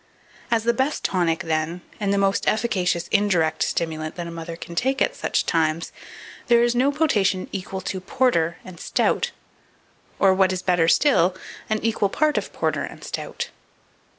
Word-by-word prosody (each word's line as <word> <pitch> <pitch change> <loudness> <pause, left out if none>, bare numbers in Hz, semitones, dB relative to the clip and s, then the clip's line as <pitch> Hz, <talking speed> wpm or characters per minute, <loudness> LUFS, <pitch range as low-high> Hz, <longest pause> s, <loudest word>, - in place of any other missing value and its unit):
As 230 -2 +2
the 235 +1 +2
best 265 +5 -1
tonic, 170 -3 +1
then, 160 +2 -1 0.2
and 200 -2 0
the 200 - +2
most 195 0 +1
efficacious 185 -6 +1
indirect 185 -6 +2
stimulant 155 -1 -2
that 175 - -5
a 170 - -6
mother 165 0 -6
can 170 - -9
take 265 +10 0
at - - +1
such - - -1
times, 160 0 0 0.6
there 235 0 +5
is 240 0 +2
no 255 +4 +3
potation 210 -11 +1
equal 190 0 -5
to 185 0 -4
porter 185 -6 +1
and 180 -3 -11
stout, 475 - +1 0.9
or, 195 -1 +5
what 190 0 +3
is 185 0 -3
better 175 -3 +3
still, 185 - +4 0.3
an 215 - +1
equal 220 -3 +1
part 305 +7 +2
of - - -8
porter - - -1
and - - -7
stout. - - -5
190 Hz, 170 wpm, -23 LUFS, 170-235 Hz, 0.9 s, there